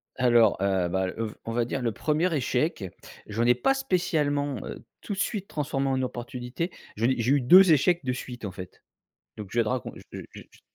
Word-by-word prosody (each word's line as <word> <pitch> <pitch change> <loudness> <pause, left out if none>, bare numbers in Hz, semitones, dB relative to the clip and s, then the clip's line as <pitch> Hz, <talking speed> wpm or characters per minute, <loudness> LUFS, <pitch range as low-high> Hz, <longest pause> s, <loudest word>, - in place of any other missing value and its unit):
Alors, 120 -6 +4
heu, 95 -3 +1
bah, 95 +1 0
heu 115 - -1
v 105 - -9
on 115 - -4
va 120 +1 +1
dire 125 +3 -3
le 115 -2 -1
1er 160 - 0
échec, 130 - -1 0.4
j'en 115 +3 -1
ai 125 0 +5
pas 125 - +2
spécialement, 150 - 0
heu, - - -8 0.2
tout 205 - -5
de - - -6
suite 200 -1 -2
transformé 140 -2 -2
en 130 -1 0
opportunité. 125 +6 -4 0.3
J'en 115 - +1
ai 130 - +3
eu 120 - -3
j'ai 125 - +1
eu 140 - +1
2 180 +8 +7
échecs 165 +3 +3
de 130 - -1
suite, 125 -1 -7
en 100 - -4
fait, 95 0 -11 0.5
donc 105 -2 -7
je 120 - +2
vais - - +2
te - - -2
racon 125 0 -3
je - - -12 0.3
je - - -10
je - - -11
j - - -22
125 Hz, 235 wpm, -26 LUFS, 115-150 Hz, 0.5 s, 2